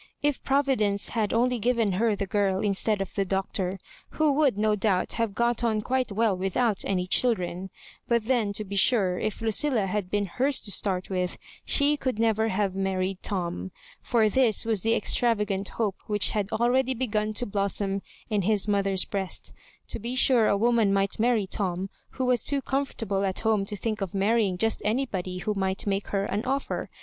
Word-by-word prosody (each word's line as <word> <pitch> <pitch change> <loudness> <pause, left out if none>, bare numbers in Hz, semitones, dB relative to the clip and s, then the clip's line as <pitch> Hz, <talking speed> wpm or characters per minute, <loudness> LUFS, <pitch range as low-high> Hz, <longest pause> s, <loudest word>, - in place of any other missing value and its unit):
If 290 -2 +1
Providence 260 -8 +1
had 220 -3 -1
only 245 +1 +1
given 230 -2 +1
her 215 +3 +1
the 200 - -3
girl 195 -1 0
in 205 -2 +1
stead 205 +1 0
of 195 - -5
the 200 - 0
Doctor, 190 0 -2 0.4
who 310 -2 +3
would 275 -7 +2
no 215 0 +2
doubt 195 -3 0
have 230 -4 -2
got 235 +1 +1
on 220 -2 +1
quite 255 -1 -1
well 215 -1 +1
without 195 +4 0
any 180 -2 0
children; 185 -3 0 0.4
but 235 -2 +1
then, 235 -4 +1
to 215 - -2
be 200 0 -6
sure, 195 -3 +3
if 215 +1 -3
Lucilla 225 0 +1
had 195 -1 -2
been 205 0 0
hers 260 +9 0
to 205 - -4
start 190 -2 0
with, 180 -1 -1 0.3
she 285 0 +3 0.3
never 220 -1 +2
could 225 - -1
have 195 -1 0
married 190 -1 -1
Tom. 180 -1 -3 0.3
For 230 -3 +2
this 225 -1 +2
was 220 -4 +1
the 225 +3 +2
extravagant 210 -5 +1
hope 210 -5 -2
which 210 -2 +2
had 205 -2 -1
already 255 +3 +1
begun 215 -3 -1
to 245 - +1
blossom 200 -1 -1 0.3
in 210 -3 0
his 205 +1 +2
mothqg| 195 -2 +1
breast. 195 -2 -3 0.4
To - - -3
be 235 +4 -4
sure 250 -4 +5
a 200 - +2
woman 230 -1 +3
might 195 +1 0
marry 230 -2 +2
Tom, 190 -1 -2 0.2
who 260 - -2
was 250 -3 +2
too 280 -2 +1
comfortable 225 -8 -2
at 190 -1 -2
home 220 -3 +1
to 210 - -4
think 215 0 -3
of 195 -1 -4
marrying 200 -1 +2
just 225 +4 0
anybody 210 -6 -2
who 210 +4 -2
might 190 -1 -2
make 200 0 -1
her 195 -1 -1
an 205 - -2
oflfer. 270 +3 -2
210 Hz, 190 wpm, -26 LUFS, 195-235 Hz, 0.4 s, sure